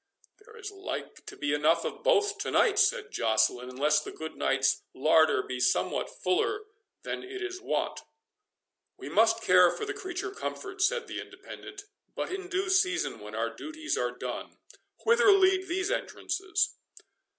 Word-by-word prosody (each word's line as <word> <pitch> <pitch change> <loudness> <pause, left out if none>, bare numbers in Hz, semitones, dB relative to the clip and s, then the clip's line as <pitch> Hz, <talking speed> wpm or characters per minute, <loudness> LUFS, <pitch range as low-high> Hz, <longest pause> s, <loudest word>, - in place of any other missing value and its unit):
"There 445 +2 -16
is 440 -2 -7
like 390 -1 -7
to - - -9
be 145 0 -1
enough 155 +3 +2
of - - -5
both 420 -4 +2
to - - -2
night," 420 -3 +3
said 400 - +2
Joceline, 115 +2 +1
"unless 145 +4 +2
the - - -7
good 160 0 -7
knight's 135 0 +1
larder 155 -1 +4
be 125 -1 -5
somewhat 125 - +1
fuller 410 - +1 0.4
than - - -4
it 385 0 -7
is 370 0 -5
wont." - - -2 1.0
"We - - -8
must 225 +1 +3
care 180 -1 +6
for 425 - -4
the 400 - -3
creature 380 -1 -5
comforts," 390 -1 -2
said 475 +2 -2
the - - -5
Independent, 400 +1 -10 0.3
"but - - -3
in 380 -1 -5
due 380 0 -1
season, 375 -1 +1
when 105 +1 -9
our 115 +1 -1
duties 315 0 -4
are - - 0
done. - - -6 0.5
Whither 465 -2 +6
lead 380 -1 +4
these 365 +1 -1
entrances?" 385 0 -1
375 Hz, 160 wpm, -29 LUFS, -, 1.0 s, care